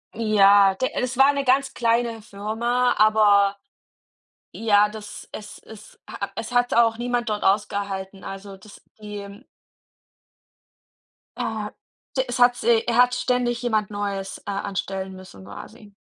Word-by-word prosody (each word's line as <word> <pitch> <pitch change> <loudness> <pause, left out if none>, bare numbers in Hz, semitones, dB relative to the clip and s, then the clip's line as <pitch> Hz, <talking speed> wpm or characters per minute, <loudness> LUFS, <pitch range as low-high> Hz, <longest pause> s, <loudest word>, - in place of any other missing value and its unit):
Ja, 200 -3 +5
d 255 +7 -2
das 250 0 -3
war 270 +1 +7
eine 280 -1 +1
ganz 270 +1 +1
kleine 230 -1 0
Firma, 235 +4 -1
aber 205 -2 +4 1.0
ja, 210 -2 +3
das 210 -1 -10
es 210 -1 -9
ist 220 -1 -15
ha 200 0 -5
es 225 +4 -6
hat 245 0 +2
auch 230 -1 +3
niemand 240 0 -2
dort 210 -1 -2
ausgehalten, 195 -1 -1
also 195 0 -8
das 210 +2 -16 0.2
die 205 +1 -9 1.9
Äh, 220 -4 -3 0.5
d 260 - +3
es 245 0 -4
hat 245 0 +5
sie 235 -2 +2
er 235 - 0
hat 250 0 +5
ständig 250 -1 0
jemand 220 -4 0
Neues, 200 -2 -4
äh, - - -27
anstellen 195 -1 -4
müssen 185 - -13
quasi. 205 - -12
215 Hz, 140 wpm, -23 LUFS, 200-240 Hz, 1.9 s, war